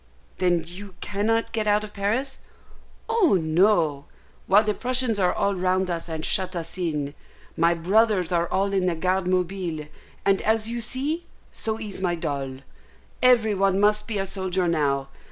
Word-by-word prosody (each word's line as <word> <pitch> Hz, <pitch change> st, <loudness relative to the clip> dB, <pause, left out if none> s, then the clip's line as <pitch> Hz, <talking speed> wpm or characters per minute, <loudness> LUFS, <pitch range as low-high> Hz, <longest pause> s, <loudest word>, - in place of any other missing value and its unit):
"Then 175 Hz, -2 st, +2 dB
you 190 Hz, +2 st, -10 dB
cannot 220 Hz, +3 st, -1 dB
get 220 Hz, -1 st, -2 dB
out 210 Hz, 0 st, +3 dB
of 210 Hz, -, -9 dB
Paris?" 230 Hz, +7 st, -2 dB, 0.7 s
"Oh 445 Hz, -, +3 dB
no, 160 Hz, -3 st, +2 dB, 0.4 s
while 205 Hz, +3 st, +6 dB
the 210 Hz, -1 st, 0 dB
Prussians 250 Hz, -2 st, 0 dB
are 180 Hz, -2 st, +3 dB
all 200 Hz, -, 0 dB
round 185 Hz, 0 st, 0 dB
us, 170 Hz, 0 st, -4 dB
and 160 Hz, -1 st, -3 dB
shut 185 Hz, -2 st, 0 dB
us 165 Hz, -1 st, -5 dB
in. 150 Hz, -6 st, -2 dB, 0.4 s
My 170 Hz, +1 st, +3 dB
brothers 190 Hz, +1 st, +2 dB
are 170 Hz, -1 st, +1 dB
all 195 Hz, +1 st, 0 dB
in 190 Hz, -2 st, +1 dB
the 175 Hz, -, +1 dB
Garde 185 Hz, +2 st, 0 dB
Mobile, 180 Hz, -4 st, -1 dB, 0.4 s
and, 195 Hz, -1 st, +3 dB, 0.2 s
you 235 Hz, +1 st, -2 dB
see, 290 Hz, +9 st, -2 dB, 0.2 s
so 220 Hz, 0 st, -3 dB
is 210 Hz, -4 st, -6 dB
my 175 Hz, -2 st, +1 dB
doll. 135 Hz, -4 st, -4 dB, 0.6 s
Every 235 Hz, -4 st, +5 dB
one 195 Hz, 0 st, +2 dB
must 210 Hz, +2 st, +2 dB
be 220 Hz, -3 st, -2 dB
a 195 Hz, -, -1 dB
soldier 190 Hz, -2 st, -1 dB
now. 140 Hz, -4 st, 0 dB
190 Hz, 165 wpm, -24 LUFS, 170-215 Hz, 0.7 s, while